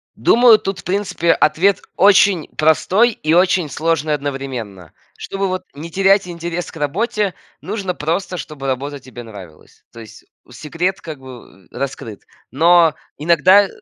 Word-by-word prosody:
Думаю, 235 -2 +5
тут, 195 -1 -4
в - - -12
принципе, 185 -3 0
ответ 175 +6 +2 0.2
очень 195 -3 +4
простой 185 +9 +3
и 155 -5 -2
очень 180 -3 +2
сложный 155 0 -1
одновременно. 130 - -6 0.2
Чтобы 195 0 -3
вот 185 0 -3
не 160 +4 -9
терять 195 +1 +3
интерес 175 0 -5
к - - -12
работе, 195 - -1 0.3
нужно 195 -2 -4
просто, 175 +4 -3
чтобы 145 -5 -7
работа 140 +2 -3
тебе 125 -2 -11
нравилась. 95 -8 -14
То 115 - -13
есть 110 -1 -13 0.3
секрет 165 +9 -3
как 155 -4 -8
бы, 125 -7 -14
э, - - -11
раскрыт. 130 -6 -6 0.3
Но 165 +2 +4 0.2
иногда 175 +6 +4
165 Hz, 145 wpm, -18 LUFS, 135-190 Hz, 0.3 s, Думаю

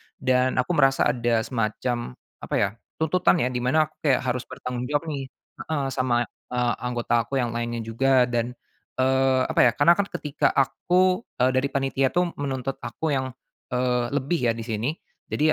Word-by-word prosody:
dan 130 0 +1
aku 125 +6 0
merasa 135 -4 +4
ada 120 -2 +1
semacam, 120 - -2 0.2
apa - - -4
ya, 100 - +2 0.3
tuntutan 175 +4 +2
ya 125 - 0
di 125 - -2
mana 130 +6 +3
aku - - -38
kayak 140 -5 +2
harus 125 0 -4
bertanggung 125 -1 -5
jawab 150 +3 -1
nih, 135 -2 -4 0.4
heeh, 150 -3 -1
sama, 125 -2 +1 0.3
eee, 120 -1 +1
anggota 120 -1 0
aku 135 - -4
yang 120 -3 0
lainnya 120 0 -3
juga 130 +3 +3
dan, 120 0 -1 0.4
eee, 130 0 +3
apa - - 0
ya - - +4
karena 145 +4 +5
kan 200 - +1
ketika 150 -6 -1
aku 180 +7 +2 0.2
eee, 125 +1 +3
dari 130 +1 +1
panitia 135 -1 0
tuh 175 -1 +2
menuntut 135 -2 -2
aku 120 +7 -4
yang, 130 -2 -1 0.4
eee, 125 -1 +1
lebih 145 -1 0
ya - - -1
di 115 - -6
sini, 115 +4 -1 0.4
jadi 155 +2 +2
130 Hz, 180 wpm, -25 LUFS, 120-140 Hz, 0.4 s, karena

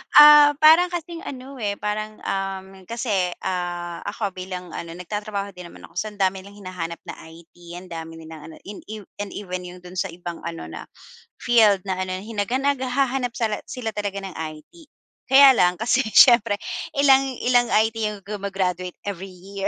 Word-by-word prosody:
ah, 295 -1 +9
parang 325 +3 +8
kasing 340 -1 -6
ano, 265 0 -8
eh, 205 -3 -1
parang, 215 +1 -4
um, 195 -1 -3 0.2
kasi, 205 -7 -1
ah, 175 -2 -3
ako 205 -3 -3
bilang 185 -1 -7
ano 165 0 -7
nagtatrabaho 200 +2 -5
din 180 -2 -10
naman - - -15
ako. - - -6
So, 215 - -2
ang 210 -1 -11
dami 190 0 +1
nilang 200 +2 -13
hinahanap 170 -2 -6
na - - -9
IT, 165 +1 -16 0.2
ang 180 0 -11
dami 165 0 -7
nilang 160 -1 -11
ano 160 - -11
in 205 0 -9
ev 215 -1 -7 0.2
and 205 -1 -5
even 180 -2 -5
'yong 180 0 -12
do'n 180 0 -7
sa - - 0
ibang 175 -1 -8
ano 165 0 -6
na - - -8 0.5
field 215 -5 +4
na 190 -1 -3
ano 185 0 -2
hinagan 225 +4 -2
naghahanap 260 -2 0
sala 220 -3 -1
sila 235 -3 -4
talaga 200 -2 -4
ng 195 - -6
IT. 160 - -9 0.4
Kaya 270 +1 +8
lang 180 -8 +3
kasi 235 +6 +1 0.2
siyempre 235 -5 +7 0.4
ilang 275 -1 +5 0.2
ilang 245 -1 +3
IT 220 0 +2
'yong 210 -2 -2
guma-graduate 190 -3 -3
every 195 -1 -6
year, 195 +2 -5
200 Hz, 175 wpm, -23 LUFS, 180-235 Hz, 0.5 s, ah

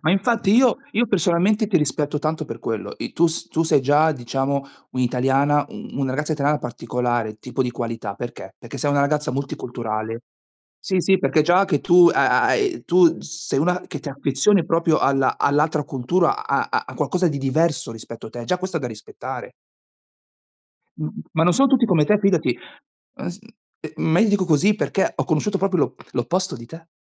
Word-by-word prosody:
Ma 155 - +1
infatti 200 +1 +1
io 255 0 +4
io 235 +2 +2
personalmente 195 +4 +2
ti 195 -4 +2
rispetto 150 0 0
tanto 155 +1 -2
per 115 -4 -8
quello. 110 -2 -4
I - - -6
tu 170 - +3 0.2
tu 165 - +1
sei 160 -4 +3
già 150 +3 +3
diciamo 135 +2 -2 0.3
un'italiana, 135 +3 +1
u - - -10
una 135 -1 0
ragazza 150 +4 -2
italiana 145 0 +1
particolare, 120 -2 -3
tipo 125 +3 -3
di 125 - -2
qualità, 115 -4 -5
perché? 120 +4 -8
Perché 125 +3 -9
sei 145 +3 0
una 145 - +2
ragazza 150 +2 0
multiculturale. 115 -4 -4 0.6
Sì, 190 - 0
sì, 190 +1 +3
perché 160 -4 +2
già 175 +4 +4
che 145 -7 0
tu 175 0 +6
ha - - +3
ha - - +3
hai, 395 -6 0
tu 175 -1 +4
sei 165 -3 -4
una 180 +4 +1
che - - -6
ti 145 - -7
affezioni 140 +7 +2
proprio 165 -1 +2
alla 135 -1 +2
all'altra 150 +1 +2
cultura, 185 - 0
a - - 0
a - - -2
qualcosa 180 -1 0
di 145 -3 -3
diverso 145 0 0
rispetto 115 0 -10
a - - -17
te, 120 -1 -7
già 180 +6 -1
questo 185 -2 -4
è - - -10
da 125 - -3
rispettare. 105 -1 -8 1.5
M 75 - -3
m - - -5 0.2
ma 160 - +1
non 175 +1 +4
sono 275 +1 +4
tutti 255 -3 +3
come 165 -7 +3
te, 210 +4 +3
fidati, 180 - +1 0.6
ah - - -5
s 175 +3 -8 0.4
eh 155 - -8
m - - -3
ma 175 - +4
io - - +6
ti 210 - +2
dico 200 -2 +2
così, 180 +7 +3
perché 195 -2 -1
ho - - -1
conosciuto 190 +5 0
proprio 195 -1 0
l'oppo 145 - -2
l'opposto 180 +9 -1
di 115 - -11
te. 165 +4 -12
155 Hz, 200 wpm, -21 LUFS, 130-180 Hz, 1.5 s, tu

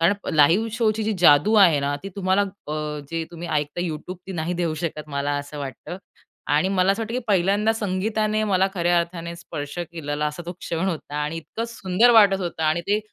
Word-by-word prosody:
कारण 170 +4 +4 0.2
लाईव्ह 170 +10 +4
शोची 220 -2 +1
जी 220 - 0
जादू 165 +4 +5
आहे 185 -8 +6
ना, 140 +1 -1
ती 195 - -5
तुम्हाला 190 0 +2
अ, 155 -6 -5
जे 165 -1 -2
तुम्ही 170 0 -7
ऐकता 150 +2 -1
YouTube, 175 +1 -4
ती 190 - -6
नाही 170 0 -2
देऊ 170 -2 -1
शकत, 155 -2 -4
मला 140 0 -2
असं 145 +1 -8
वाटतं. 140 +5 -6 0.6
आणि 150 +6 +3
मला 190 0 +3
असं 215 +3 -3
वाटतं 225 +1 -5
की - - +1
पहिल्यांदा 200 +3 +2
संगीताने 215 +1 -1
मला 190 -2 +2
खऱ्या 175 -1 +2
अर्थाने 170 0 -5
स्पर्श 145 -2 -7
केलेला 150 -2 -2
असा 150 +3 -5
तो 175 - -4
क्षण 175 +1 -3
होता. 160 -4 -5
आणि 150 +2 -2
इतकं 220 +7 -5
सुंदर 225 +1 +3
वाटत 200 -3 +6
होतं. 170 -3 -4
आणि 155 +2 +2
ते 210 +1 +3
175 Hz, 200 wpm, -23 LUFS, 155-200 Hz, 0.6 s, आहे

